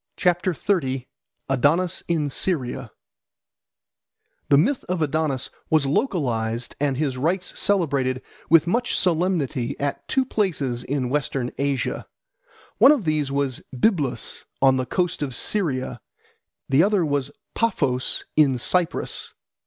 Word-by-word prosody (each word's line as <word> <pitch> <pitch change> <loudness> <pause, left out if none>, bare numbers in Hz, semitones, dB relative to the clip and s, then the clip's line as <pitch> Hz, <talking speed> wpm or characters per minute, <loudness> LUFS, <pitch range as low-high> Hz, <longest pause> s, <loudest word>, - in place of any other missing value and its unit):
Adonis 155 +7 +2
in 160 -4 +1
Syria 140 -3 -2 1.6
THE 140 - +6
MYTH 245 - +2
of 180 -1 -2
Adonis 150 -3 -1 0.2
was 155 -3 +3
localised 125 - -1
and 140 -2 0
his 135 -4 -1
rites 175 +6 -1
celebrated 140 -10 +1 0.3
with 165 0 +6
much 240 +8 +1
solemnity 160 -8 0
at 140 0 -3
two 265 -1 +1
places 150 - -1
in 130 -2 -2
Western 135 -3 -1
Asia. 140 -2 -1 0.7
One 275 - +9
of 275 - +1
these 150 -3 0
was 140 -2 -1 0.2
Byblus 140 - 0 0.2
on 135 -1 +5
the 130 -1 -2
coast 175 +2 -1
of 135 -4 -2
Syria, 130 - -1 0.7
the 135 +2 +4
other 195 -2 +3
was 145 -2 -1 0.2
Paphos 140 - 0
in 140 -4 +4
Cyprus. 175 +8 0
145 Hz, 115 wpm, -23 LUFS, 130-180 Hz, 1.6 s, One